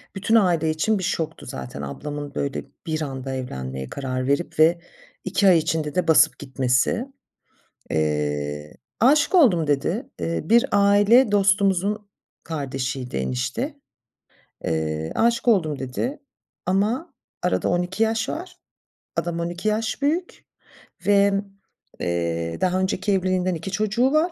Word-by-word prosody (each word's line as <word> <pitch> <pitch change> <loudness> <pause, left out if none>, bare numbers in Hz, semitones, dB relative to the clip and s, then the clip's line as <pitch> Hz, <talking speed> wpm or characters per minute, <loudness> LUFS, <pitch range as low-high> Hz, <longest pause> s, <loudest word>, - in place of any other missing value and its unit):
Bütün 215 +4 +1
aile 175 -7 +3
için 175 +7 +1
bir - - -4
şoktu 160 -2 -3
zaten 70 +1 -7
ablamın 145 - -6
böyle 140 -1 -2 0.2
bir 160 -1 -1
anda 135 -2 -4
evlenmeye 65 - -5
karar 130 -2 -3
verip 140 +4 -1
ve 165 +2 +5 0.5
2 190 +1 +2
ay 180 -3 +7
içinde 155 -2 -1
de 180 -2 +1
basıp 160 -1 +5
gitmesi. 130 - 0 0.8
Eee, 75 -1 -1 0.3
“Âşık 290 - +4
oldum.” 210 - +5
dedi. 145 -2 0
Eee, 85 0 -1
bir 235 +2 +4
aile 205 +4 +5
dostumuzun 200 0 +2 0.4
kardeşiydi, 135 -4 -4
enişte. 65 -1 -2 0.9
Eee, 80 0 -2
“Âşık 235 +1 +2
oldum.” 160 -10 +3
dedi 135 - -3 0.5
ama 210 - 0 0.3
arada 90 - +1
12 180 +4 0
yaş 225 0 +1
var. 355 +3 -6 0.6
Adam 170 -1 -2
12 175 +4 -3
yaş 220 +5 -1
büyük 325 +6 -1 0.6
ve, 200 0 +5 0.7
eee, 85 -1 -2
daha 185 0 +2
önceki 190 +1 0
evliliğinden 185 -1 +1
2 165 +4 -6
çocuğu 215 +6 +1
var. 315 +4 +2
170 Hz, 125 wpm, -23 LUFS, 130-205 Hz, 0.9 s, ay